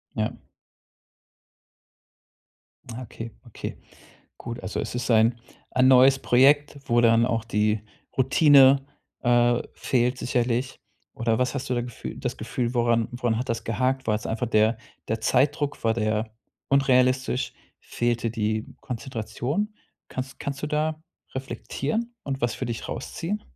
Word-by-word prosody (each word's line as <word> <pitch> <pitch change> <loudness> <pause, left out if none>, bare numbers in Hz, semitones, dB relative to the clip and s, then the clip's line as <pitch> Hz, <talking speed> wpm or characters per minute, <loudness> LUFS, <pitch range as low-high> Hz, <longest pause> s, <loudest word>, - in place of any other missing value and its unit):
Ja. - - 0 2.6
Ja 115 +2 -6
okay, 115 -1 -8
okay. 120 - -7 0.6
Gut, 120 +1 -6
also - - -3
es - - -5
ist 125 0 -2
ein 115 +1 +4 0.3
ein 130 0 +4
neues 130 +1 +7
Projekt, 140 +4 +4
wo 120 0 +3
dann 115 0 +5
auch 115 -2 -1
die 105 -2 +1 0.4
Routine, 135 0 +6 0.4
äh, 120 -1 +3
fehlt 125 0 0
sicherlich. 125 +1 -1 0.3
Oder 115 -1 0
was 125 +1 0
hast 140 -1 -4
du 125 - +2
gefüh 120 -1 -7
das - - -4
Gefühl, 120 0 -3
woran 115 -1 +2
woran 120 -2 0
hat 125 +2 -3
das 115 0 -2
gehakt? 130 +3 0
War 105 - +2
das 105 - -3
einfach 115 +2 -2
der 110 +1 +3 0.3
der 110 0 -1
Zeitdruck, 145 +3 +1
war 115 - +3
der 110 0 -1 0.4
unrealistisch, 130 -1 +2 0.3
fehlte 120 -1 -1
die 110 -1 -1
Konzentration? 130 - -3 0.3
Kanns 130 +2 -6
kannst 140 0 -5
du - - -1
da 155 +1 -1 0.3
reflektieren 150 - -3
und 135 -1 -3
was 120 -1 0
für 130 - -4
dich 115 -1 -5
rausziehen? 205 +5 -4
125 Hz, 140 wpm, -25 LUFS, 115-135 Hz, 2.6 s, neues